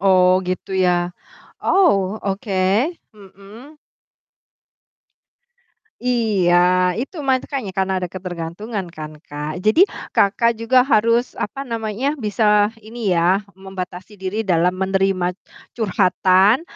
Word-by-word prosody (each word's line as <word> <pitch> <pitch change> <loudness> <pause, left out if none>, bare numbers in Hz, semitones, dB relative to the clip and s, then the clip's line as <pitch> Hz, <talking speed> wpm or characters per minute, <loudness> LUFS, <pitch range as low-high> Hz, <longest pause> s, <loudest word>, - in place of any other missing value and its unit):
Oh 185 -1 +4
gitu 185 +1 -4
ya, 175 -1 +2 0.5
oh 210 - +2
oke. 195 +1 -3 0.6
Mhm. 210 +8 -15 2.3
Iya 215 -8 +2 0.5
itu 310 +7 -7
makanya, 260 -5 -1
karena 190 0 +1
ada 185 - -2
ketergantungan 185 +3 -5
kan 155 -2 -7
Kak. 150 +2 -5
Jadi 215 +11 +4 0.3
Kakak 230 +4 +3
juga 250 +3 +2
harus 230 0 +2
apa 275 +6 -5
namanya, 230 +3 -2
bisa 210 0 +3 0.2
ini 225 -2 -4
ya, 180 +4 +3 0.2
membatasi 190 0 -8
diri 205 +4 -3
dalam 180 0 +1
menerima 190 -1 0 0.4
curhatan, 190 - +3
195 Hz, 100 wpm, -20 LUFS, 185-230 Hz, 2.3 s, Oh